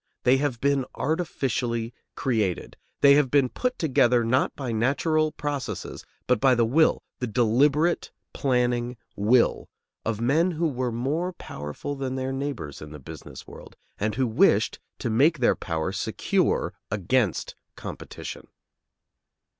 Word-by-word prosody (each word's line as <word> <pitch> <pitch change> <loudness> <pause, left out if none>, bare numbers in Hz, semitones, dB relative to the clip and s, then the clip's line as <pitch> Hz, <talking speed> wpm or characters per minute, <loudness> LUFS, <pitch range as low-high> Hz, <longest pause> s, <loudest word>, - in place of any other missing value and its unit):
They 125 +2 +5
have 135 -4 -1
been 140 0 +2
artificially 130 -7 -1 0.2
created; 110 -9 -1 0.3
they 140 0 +8
have 145 -2 +4
been 135 -1 +3
put 250 - -2
together, 125 -6 +3
not 130 +4 +1
by 130 -4 -4
natural 150 +7 +1
processes, 135 -10 -4 0.2
but 125 -3 +2
by 130 0 +5
the 115 -1 +3
will, 155 +8 +3 0.2
the 125 - -2
deliberate 135 +9 +2 0.2
planning 125 -2 0 0.2
will, 115 +4 +2 0.3
of 110 -2 -2
men 150 +10 +3
who 170 -1 0
were 125 -3 -2
more 150 +10 -1
powerful 75 - -6
than 135 -1 -3
their 130 0 -2
neighbors 135 - -4
in 75 - -8
the 75 - -9
business 65 - -10
world, - - -12 0.2
and 105 +1 -1
who 130 - +1
wished 115 -2 +3 0.2
to 120 - -2
make 145 +9 +4
their 125 - +3
power 80 -2 -2
secure - - 0 0.2
against 105 0 0 0.2
competition. - - -8
130 Hz, 140 wpm, -26 LUFS, 115-145 Hz, 0.3 s, they